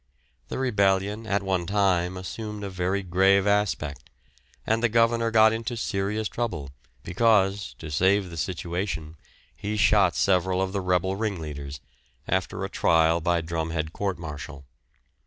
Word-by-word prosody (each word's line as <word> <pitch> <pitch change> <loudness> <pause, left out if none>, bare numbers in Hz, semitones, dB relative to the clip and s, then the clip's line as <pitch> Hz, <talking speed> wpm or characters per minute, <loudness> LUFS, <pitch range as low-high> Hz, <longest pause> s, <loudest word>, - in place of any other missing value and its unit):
The - - -5
rebellion 105 -3 +1
at 100 -1 0
one 95 -3 -1
time 95 -2 +1
assumed 105 +3 -6
a 100 - -5
very 95 +2 -1
grave 95 +2 +3
aspect, 100 -8 0 0.6
and 110 +1 +1
the 120 - +3
governor 115 0 +2
got 110 0 +5
into 115 +1 -3
serious 105 0 -1
trouble, 85 - -4 0.3
because, 100 0 +2
to 80 -2 -8
save 95 +4 +2
the 85 - -8
situation, 85 -1 -3 0.4
he 105 +1 -4
shot 100 -3 +4
several 95 -1 +2
of 95 0 -1
the 100 - -1
rebel 90 +1 +1
ringleaders, 75 -10 -4 0.5
after - - -1
a - - -3
trial 80 0 +3
by 85 0 +1
drumhead 80 -1 -3
court 100 -3 -2
martial. 75 -3 -8
95 Hz, 140 wpm, -26 LUFS, 85-105 Hz, 0.6 s, got